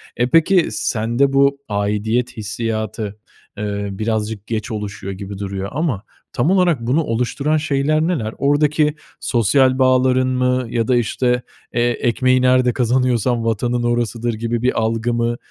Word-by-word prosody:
E, 120 +1 0
peki 165 +5 +4
sende 120 +5 0
bu 140 0 +3
aidiyet 110 +4 -1
hissiyatı, 110 0 -4 0.4
eee, 100 -1 -3
birazcık 110 0 -3
geç 110 +1 -3
oluşuyor 100 -2 -5
gibi 100 0 -7
duruyor 100 -1 -4
ama 140 - -2 0.3
tam 145 +9 +1
olarak 180 -9 +3
bunu 135 +8 +1
oluşturan 140 +5 0
şeyler 150 0 +1
neler? 150 -10 -1
Oradaki 150 +1 +2 0.2
sosyal 130 +3 +2
bağların 130 0 +3
mı 125 0 +1
ya 115 -1 -1
da 125 - +3
işte, 125 +1 +1 0.3
eee, 120 - +1
ekmeği 125 +2 +1
nerede 125 -1 +3
kazanıyorsan 125 -1 +1
vatanın 120 +2 0
orasıdır 120 0 -1
gibi 115 +1 -2
bir 125 -1 +1
algı 115 +1 0
mı 120 0 0
120 Hz, 140 wpm, -19 LUFS, 110-130 Hz, 0.4 s, peki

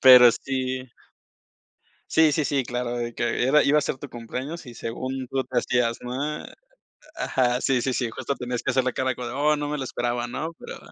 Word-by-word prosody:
Pero 125 -2 +10
sí 130 +1 -3 1.2
Sí, 160 -1 +5
sí, 155 - +1
sí, 140 -1 +1
claro, 120 0 -2
de 120 0 -3
que 120 +1 0
era 150 +3 +5
iba 145 +2 +4
a - - +4
ser 140 - -2
tu 140 +1 -8
cumpleaños 130 +8 -6
y 120 - -9
según 130 +3 -4
tú 135 -1 0
te 125 0 -3
hacías, 120 -1 +1
ma 140 +5 -3 0.7
ajá, 125 - +1
sí, 130 -2 +2
sí, 125 -1 -1
justo 140 - -3
tenías 125 -1 -3
que 130 - 0
hacer 130 0 +2
la 130 - 0
cara 130 +1 0
como: 125 -1 -5
"Oh, 145 +4 +2
no 145 0 -3
me 150 0 -2
lo 135 - -2
esperaba", 120 -1 -2
¿no? 155 +7 -4
Pero - - -8
130 Hz, 205 wpm, -25 LUFS, 120-140 Hz, 1.2 s, Pero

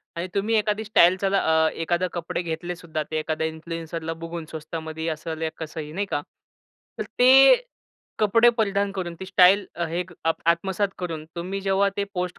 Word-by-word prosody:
आणि 170 +2 -3
तुम्ही 215 +3 +1
एखादी 210 0 0
स्टाईल, 185 -4 +5
चला 195 0 +2 0.3
अ, - - +3
एखादे 175 +2 -1
कपडे 175 0 -3
घेतले 175 +1 -4
सुद्धा 160 -3 -4
ते 155 - 0
एखाद्या 160 0 -2
इन्फ्लुएन्सरला 165 0 -5
बघून 165 -1 -5
स्वस्तामध्ये 160 0 -5
असेल 160 +1 -6
या 160 - 0
कसंही 155 -1 -6
नाही 200 +4 -1
का? 145 - 0 0.8
तर - - 0 0.2
ते 270 - +8 0.6
कपडे 230 +3 +5
परिधान 200 -2 +1
करून, 180 -3 -4
ती 190 - -6
स्टाईल 190 +1 +5
अ, 170 - -2
हे 175 +2 -2 0.2
आ 165 - +3 0.2
आत्मसात 190 +4 0
करून 165 -4 -4
तुम्ही 190 +3 -4
जेव्हा 195 +1 +2
ते 200 - 0
पोस्ट 180 0 -3
175 Hz, 175 wpm, -24 LUFS, 160-195 Hz, 0.8 s, ते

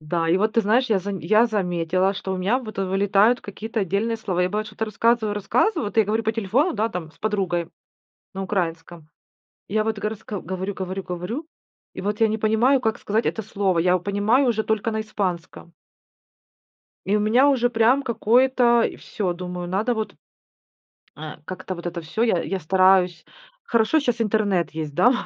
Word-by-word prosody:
Да, 165 +2 -1
и 170 - +4
вот 215 +3 +1
ты 230 - +3
знаешь, 230 +4 +2
я 205 - +4
заме 195 0 -5
я 220 +2 +5
заметила, 185 -2 0
что 190 -1 -4
у - - -2
меня, 195 +7 +1
вот, 220 -6 -9
вылетают 195 +4 +2
какие-то 220 +3 -5
отдельные 200 +5 -1
слова. 185 -5 -1
Я, 180 - +1
бывает, 210 +3 -2
что-то 210 +1 -4
рассказываю 220 0 +1
рассказываю, 235 - +1
вот 205 - -7
я 220 - +5
говорю 215 +3 0
по 220 0 0
телефону, 225 - +1
да, 220 +1 0
там 180 -7 -6
с - - -26
подругой 190 -5 -1 0.7
на 195 0 -4
украинском. 170 -4 -4 0.6
И - - -9
я 215 - +3
вот 220 -1 -2
горасска 210 -1 -5
говорю 190 +2 -4
говорю 190 0 -5
говорю, 180 - -5 0.5
и - - -7
вот 205 +3 -3
я 225 - +6
не 220 0 -1
понимаю, 230 +5 +3
как 220 -2 -1
сказать 220 +3 -1
это 220 - -2
слово. 195 -4 0
Я 180 +2 +3
у - - 0
понимаю 205 +8 +2
уже 220 -2 +1
только 220 +1 -1
на 220 0 -1
испанском. 185 -5 -4 1.3
И 205 - +2
у - - +1
меня 240 +7 +4
уже 245 -3 +2
прям 240 +4 +3
какое-то, 240 0 +3
э, - - -1
всё, 190 -4 -3
думаю, 180 0 -6
надо 210 +7 0
вот, 220 -1 -4 1.0
э, 155 0 -8
как-то, 185 +2 -6
вот 175 0 -8
это 175 0 -4
всё. 165 +8 -3
Я 225 -7 +2
я 190 -1 -3
стараюсь. 185 0 +3 0.4
Хорошо, 230 - +2
щас 245 -4 -1
интернет 205 -7 +1
есть, 155 -2 -5
да, 240 - +5
205 Hz, 190 wpm, -23 LUFS, 185-225 Hz, 1.3 s, я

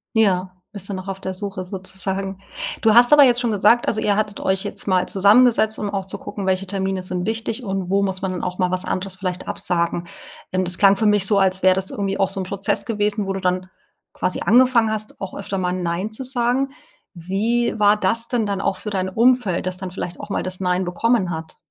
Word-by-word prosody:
Ja, 190 -4 +2 0.2
bist 200 -2 -6
du - - -3
noch 185 0 -6
auf 195 0 -5
der 190 0 -4
Suche 195 -1 -5
sozusagen? 190 +1 -4 0.4
Du 220 -1 +4
hast 240 +2 +7
aber 295 -1 +9
jetzt 245 -2 +4
schon 240 -3 0
gesagt 230 +3 +3
also, 215 - 0
ihr 205 - +2
hattet 210 -1 -2
euch 190 0 0
jetzt - - -5
mal 185 -2 +2
zusammengesetzt, 220 +2 +4
um 205 - -2
auch 195 -1 -3
zu 195 +1 -5
gucken, 200 0 -6
welche 190 0 0
Termine 190 -1 -2
sind 180 -1 -3
wichtig 225 +2 -3
und 195 -3 -3
wo 200 +1 +2
muss 190 -1 -2
man 190 -1 -2
dann 180 - -5
auch 180 0 -3
mal 180 -1 0
was 185 0 -1
anderes 190 0 -3
vielleicht 185 -2 -4
absagen. 170 0 -1 0.4
Ähm, 185 0 0
das 180 +1 +1
klang 195 -1 +5
für 215 - -1
mich 210 -2 +4
so, 205 - +3
als 190 -1 +2
wäre 185 0 +5
das 190 0 0
irgendwie 195 -1 -3
auch 195 - +2
so 195 - 0
’n - - -2
Prozess 195 +1 -1
gewesen, 210 -2 -1
wo 195 - -1
du 195 - -4
dann 185 0 -1 0.4
quasi 180 - -2
angefangen 240 -1 +4
hast, 215 0 -4
auch 195 - -6
öfter 200 0 -4
mal 180 -1 -1
„Nein” 180 +3 -2
zu 220 +4 -5
sagen. 255 +1 0 0.4
Wie 205 +7 -1
war 205 0 +5
das 225 +4 +1
denn 235 -3 0
dann 200 -1 -2
auch - - 0
für 210 - -5
dein 190 -2 -1
Umfeld, 230 -3 +2
das 185 0 -3
dann 185 -1 -6
vielleicht 180 -1 -6
auch - - -8
mal - - -2
das 185 0 -5
„Nein” 180 0 0
bekommen 195 +2 +1
hat? 160 -1 -7
195 Hz, 235 wpm, -21 LUFS, 185-215 Hz, 0.4 s, aber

